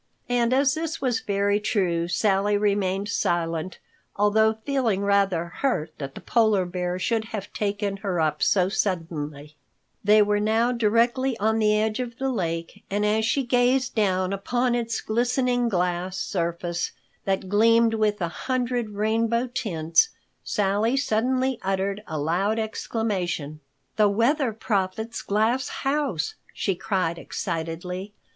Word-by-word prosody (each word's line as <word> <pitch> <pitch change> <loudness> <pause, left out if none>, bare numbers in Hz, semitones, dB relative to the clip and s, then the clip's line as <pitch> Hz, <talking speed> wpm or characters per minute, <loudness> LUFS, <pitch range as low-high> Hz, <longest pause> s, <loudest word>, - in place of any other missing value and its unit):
And 240 -1 +2
as 270 +1 +3
this 320 0 -3
was 250 -4 0
very 200 0 +1
true, 180 -6 0
Sally 200 +3 +2
remained 200 -1 0
silent, 170 -2 -1 0.4
although 220 +2 +3
feeling 250 -8 +1
rather 200 -4 +2
hurt 175 - -1
that 135 -1 -6
the - - -8
Polar 220 -5 +2
Bear 180 0 -3
should 220 +4 0
have 210 -3 -6
taken 205 -1 -2
her 195 -4 -2
up 155 -1 0
so 185 -2 +3
suddenly. 155 -6 -3 0.5
They 210 +1 +6
were 205 0 +1
now 220 +3 +2
directly 240 +2 +2
on 220 +1 +1
the 210 -1 +3
edge 215 +2 0
of 240 -2 -4
the 270 0 -1
lake, 170 -2 -3
and 205 +1 0
as 215 +1 +2
she 275 +4 +1
gazed 250 +1 +2
down 190 -3 +1
upon 240 +5 0
its 230 -1 -1
glistening 245 +1 +1
glass 180 -1 -1
surface 170 -1 -2 0.3
that 195 -1 -1
gleamed 230 +3 +4
with 215 -2 +1
a 170 - +1
hundred 245 +2 -2
rainbow 230 +3 +1
tints, 165 - +2 0.3
Sally 210 +5 +1
suddenly 255 +1 +1
uttered 195 +1 -1
a 160 - -4
loud 180 +9 0
exclamation, 200 -9 -2 0.4
"The 210 -1 +5
Weather 240 +5 +2
Prophet's 215 0 -2
glass 225 +5 +1
house!" 270 - -1 0.2
she 195 - 0
cried 180 -3 -1
excitedly. 180 +4 -4
210 Hz, 140 wpm, -25 LUFS, 185-230 Hz, 0.5 s, They